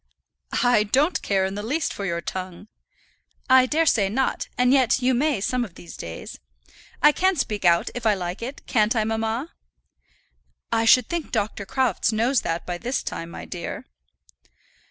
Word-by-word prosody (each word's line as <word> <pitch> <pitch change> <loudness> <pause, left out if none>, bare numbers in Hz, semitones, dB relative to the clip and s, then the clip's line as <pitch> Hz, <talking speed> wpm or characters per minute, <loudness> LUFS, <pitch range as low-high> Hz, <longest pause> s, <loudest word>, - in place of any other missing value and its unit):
"I 245 -3 +4
don't 270 - +1
care 195 -2 +1
in 190 - -3
the 205 - -4
least 285 +9 -1
for 200 - -5
your 170 -1 -2
tongue." 185 +3 -6 0.8
"I 260 -1 +6
dare 320 +4 +2
say 210 -10 +3
not, 260 +6 -1
and 250 +1 +4
yet 260 -3 +3
you 255 0 +2
may 280 0 +1
some 250 +4 0
of 195 -7 -9
these 170 - -11
days. 80 0 -8 0.6
I 295 - +8
can 375 +5 +1
speak 210 - -2
out, 170 -1 +3
if 245 - -6
I 215 -2 +3
like 180 +1 -5
it; 255 +4 -7
can't 220 -1 +2
I, 220 - +2
mamma?" 225 +6 -2 1.2
"I 225 0 +2
should 250 +2 +6
think 340 -2 -4
Dr. 210 -3 -2
Crofts 250 -4 +1
knows 230 +3 +1
that 165 +1 -3
by 175 -1 -4
this 250 +7 -2
time, 165 - -5
my - - -8
dear." 175 -2 -6
225 Hz, 175 wpm, -24 LUFS, 195-260 Hz, 1.2 s, I